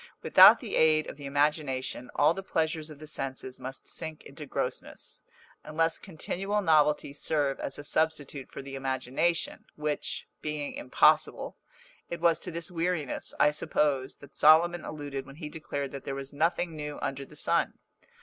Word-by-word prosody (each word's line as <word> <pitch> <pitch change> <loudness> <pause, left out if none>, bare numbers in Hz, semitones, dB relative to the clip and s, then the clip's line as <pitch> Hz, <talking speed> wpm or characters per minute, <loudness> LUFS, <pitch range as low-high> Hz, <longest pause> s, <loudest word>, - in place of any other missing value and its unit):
Without - - +9
the - - -4
aid 155 -1 +4
of - - -8
the 145 -1 -7
imagination 140 -3 0
all 150 +3 +5
the 195 - -5
pleasures 160 -3 -1
of 155 - -10
the 155 - -10
senses 130 -3 -5
must 130 +1 -6
sink 160 -1 -5
into 150 +1 -10
grossness, - - -4 0.4
unless 165 +2 0
continual 195 +3 -3
novelty 150 -5 +3
serve 145 -1 0
as 135 - -2
a 145 - -7
substitute 145 -3 -1
for 140 - -7
the 135 0 -9
imagination, 135 +5 -1
which, 150 -1 -3
being 150 -1 -3
impossible, 290 +2 +2 0.5
it 170 - -4
was 170 -1 +3
to - - -5
this 170 0 -4
weariness, 170 -4 -2
I 150 - +6
suppose, 145 -2 0
that 140 0 -15
Solomon 165 +3 +5
alluded 145 -3 -5
when 135 - -11
he 150 -1 -7
declared 145 -3 -4
that 140 - -7
there 135 - -4
was 135 0 -6
nothing 165 +2 0
new 150 -1 -5
under 135 0 -3
the - - -14
sun! - - +1
150 Hz, 165 wpm, -29 LUFS, 140-160 Hz, 0.5 s, Without